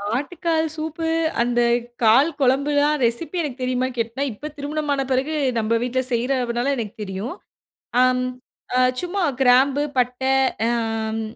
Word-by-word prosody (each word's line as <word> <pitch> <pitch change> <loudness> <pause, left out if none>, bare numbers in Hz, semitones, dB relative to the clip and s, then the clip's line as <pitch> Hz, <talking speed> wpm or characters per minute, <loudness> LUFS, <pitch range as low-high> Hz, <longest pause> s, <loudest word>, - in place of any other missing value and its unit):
ஆட்டுக்கால் 320 +3 -1
சூப்பு 320 +1 -4 0.3
அந்த 240 0 +1 0.4
கால் 255 +8 +6
குழம்புலாம் 285 +3 +2
ரெசிபி 325 +10 -2
எனக்கு 270 -4 -5
தெரியுமான்னு 255 0 -1
கேட்னா 230 +4 -2
இப்போ 290 +8 -7
திருமணம் 295 +1 -3
ஆன 275 - 0
பிறகு 270 +5 0 0.3
நம்ப 220 +1 0
வீட்ல 255 +1 0
செய்றனால 245 +1 0
எனக்கு 220 -1 -5
தெரியும் 195 - -5 0.7
அம். 255 0 +3 0.5
அ - - +4 0.2
சும்மா 365 +2 -2 0.2
கிராம்பு 265 +3 +4
பட்ட 250 +1 0 0.5
அம், 225 -1 -1
255 Hz, 125 wpm, -22 LUFS, 235-295 Hz, 0.7 s, கால்